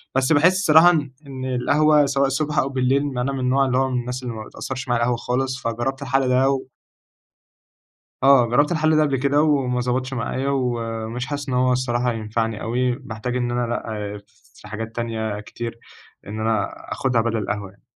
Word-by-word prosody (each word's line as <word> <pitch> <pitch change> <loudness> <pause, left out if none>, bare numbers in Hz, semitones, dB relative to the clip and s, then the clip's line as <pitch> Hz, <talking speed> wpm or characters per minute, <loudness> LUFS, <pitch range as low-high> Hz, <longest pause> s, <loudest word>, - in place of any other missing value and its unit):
بس 135 +3 +3
باحس 165 +5 +5
الصراحة 165 -2 +6
إن 145 -5 -1 0.2
إن 130 -1 -6
القهوة 145 +4 +3
سواء 140 0 +1
الصبح 150 +3 -2
أو 135 - 0
بالليل، 135 +1 +1 0.2
أنا 130 +3 0
من 135 - -3
النوع 130 +2 +2
اللي 130 -1 +1
هو 135 0 +2
من 125 - 0
الناس 125 +1 -5
اللي 120 - -4
ما 110 - -6
بتأثرش 135 +3 -6
معايا 120 -1 +1
القهوة 120 0 +1
خالص، 130 +1 -2
فجربت 120 +4 -2
الحل 135 -1 +1
ده 130 +2 +3
و 135 -1 0 1.6
آه، 135 -3 +6
جرّبت 145 +7 +2
الحل 155 -1 +2
ده 155 - +4
قبل 140 -3 +1
كده 140 +3 +2
وما 135 -5 +1
ضبطش 130 +2 -1
معايا، 130 +2 -2
ومش 120 -2 -2
حاسس 145 -1 -5
إن 125 - -1
هو 125 0 +3
الصراحة 125 -1 0
هينفعني 110 0 -2
أوي. 125 +2 0
باحتاج 125 -1 -5
إن 120 -1 -1
أنا 120 0 0
لأ، 105 -3 -4 0.3
في - - -14
حاجات 115 +1 -6
تانية 110 -3 -3
كتير 115 +2 -7 0.5
إن 105 +2 -5
أنا 110 -2 0 0.2
آخدها 130 -3 +1
بدل 115 0 -1
القهوة 105 -2 -3
يعني. 100 - -26
125 Hz, 190 wpm, -22 LUFS, 115-135 Hz, 1.6 s, الصراحة